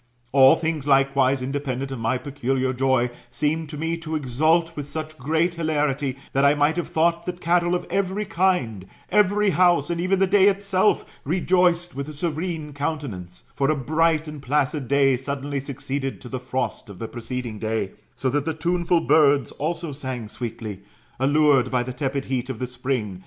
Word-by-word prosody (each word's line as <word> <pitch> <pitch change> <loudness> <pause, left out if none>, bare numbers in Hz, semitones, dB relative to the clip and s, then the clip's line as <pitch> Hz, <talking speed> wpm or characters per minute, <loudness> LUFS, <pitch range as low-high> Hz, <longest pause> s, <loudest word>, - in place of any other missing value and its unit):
All 135 -1 +7
things 160 -3 -2
likewise, 135 -1 +3
independent 135 -1 -3
of 135 - -5
my 115 +3 0
peculiar 130 -1 -1
joy, 130 -1 +1 0.2
seemed 150 +5 -1
to 150 - -7
roe 165 +2 -1
to 160 -1 -5
exult 155 +5 +1
with 145 -1 -6
such 155 +1 -5
great 160 +6 +1
hilarity, 150 -5 -1 0.2
that 135 - +2
I 140 0 +6
roight 150 +3 +2
have 175 - -1
thought 170 +1 +1
that 180 0 -4
cattle 175 +1 +2
of 175 - -3
every 195 +2 -1
kind, 170 - 0 0.2
every 210 0 +3
house, 175 -3 +3
and 170 0 -1
even 185 +2 +2
the 195 - +4
day 195 +1 +5
itself, 195 0 +2 0.2
rejoiced 175 +1 +2
with 140 +2 -4
a - - -7
serene 160 0 -3
countenance; 140 - -5
for 140 0 +1
a 155 - +3
bright 155 +3 +1
and 150 -2 -7
placid 140 0 0
day 135 -1 +3
suddenly 140 +1 -3
succeeded 135 0 -4
to 125 - -10
the 130 - -4
frost 125 -2 -3
of 100 - -10
the 115 - -5
preceding 120 -1 -5
day; 110 -3 -2 0.2
so 130 - -2
that 145 +1 0
the 160 -1 -2
tuneful 170 +1 +1
birds 145 -5 +4
also 165 +1 -3
sang 130 -5 -5
sweetly, 110 -3 -6 0.4
allured 145 -1 +4
by 125 -2 +1
the 130 +1 -5
tepid 135 0 -2
heat 130 -1 -2
of 130 - -4
the 125 - -2
spring. 125 -6 -3
145 Hz, 180 wpm, -23 LUFS, 130-165 Hz, 0.4 s, All